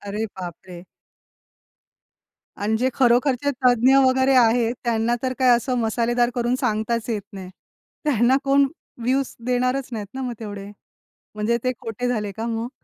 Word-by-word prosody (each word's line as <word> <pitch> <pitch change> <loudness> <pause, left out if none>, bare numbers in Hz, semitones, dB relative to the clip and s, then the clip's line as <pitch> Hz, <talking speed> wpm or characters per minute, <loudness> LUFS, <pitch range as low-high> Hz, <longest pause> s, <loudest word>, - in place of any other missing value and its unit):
अरे 210 +2 -3 0.2
बापरे! 175 0 -9 1.7
आणि 215 +2 -1
जे 255 +3 +1
खरोखरचे 255 +2 +2 0.2
तज्ञ 250 +2 +5
वगैरे 260 +1 +3
आहेत, 235 -1 +4
त्यांना 235 0 +1
तर 255 -1 0
काय 255 - +4
असं 250 +2 -2
मसालेदार 240 +1 +1
करून 240 0 0
सांगताच 230 -1 -1
येत 215 -3 -1
नाही. 190 -2 -8 0.5
त्यांना 260 -3 +3
कोण 275 0 +4 0.3
व्ह्यूज 260 +3 0
देणारच 250 +1 0
नाहीत 215 -3 -4
ना, 265 - -5
मग 250 -2 -3
तेवढे. 205 -2 -7 0.6
म्हणजे 215 +3 0
ते 255 - +1
खोटे 230 +2 -4
झाले 210 -4 -2
का 225 +1 -3
मग? 230 0 -3
240 Hz, 145 wpm, -22 LUFS, 220-255 Hz, 1.7 s, तज्ञ